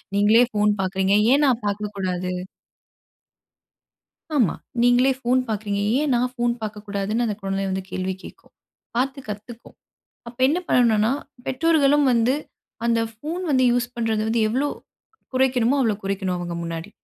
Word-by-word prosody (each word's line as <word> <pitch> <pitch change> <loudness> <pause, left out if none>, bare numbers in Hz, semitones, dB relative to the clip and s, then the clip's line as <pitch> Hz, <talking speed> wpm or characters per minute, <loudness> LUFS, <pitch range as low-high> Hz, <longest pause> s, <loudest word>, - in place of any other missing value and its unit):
நீங்களே 210 +4 +5
ஃபோன் 210 0 +2
பார்க்குறீங்க. 190 +1 +1 0.2
ஏன் 290 +2 +4
நான் 250 -4 +2
பார்க்கக்கூடாது? 195 -3 -3 2.1
ஆமா. 235 - +3 0.3
நீங்களே 245 +2 +4
ஃபோன் 255 +1 +2
பார்க்குறீங்க, 205 -2 -2 0.2
ஏன் 295 -3 +1
நான் 245 +1 +1
ஃபோன் 240 -1 +1
பார்க்கக்கூடாதுன்னு 210 +1 -2
அந்த 215 - -1
குழந்தை 195 0 -2
வந்து 190 0 -2
கேள்வி 185 0 -2
கேட்கும். - - -14 0.4
பார்த்து 270 +3 0
கத்துக்கும். 215 +3 -9 0.5
அப்ப 240 +1 -14
என்ன 315 +5 +1
பண்ணணுனா, 225 -1 +3 0.3
பெற்றோர்களும் 290 0 +3
வந்து 235 +2 +3 0.5
அந்த 230 -1 +2
ஃபோன் 310 +11 -5
வந்து 260 -2 +3
யூஸ் 245 0 -1
பண்றது 225 -2 0
வந்து 230 +1 +1
எவ்வளோ 260 +6 0 0.7
குறைக்கணுமோ 255 0 +2
அவ்ளோ 225 -4 +2
குறைக்கணும் 195 -2 -1
அவங்க 175 -1 -4
முன்னாடி. 165 +3 -5
225 Hz, 135 wpm, -23 LUFS, 200-255 Hz, 2.1 s, நீங்களே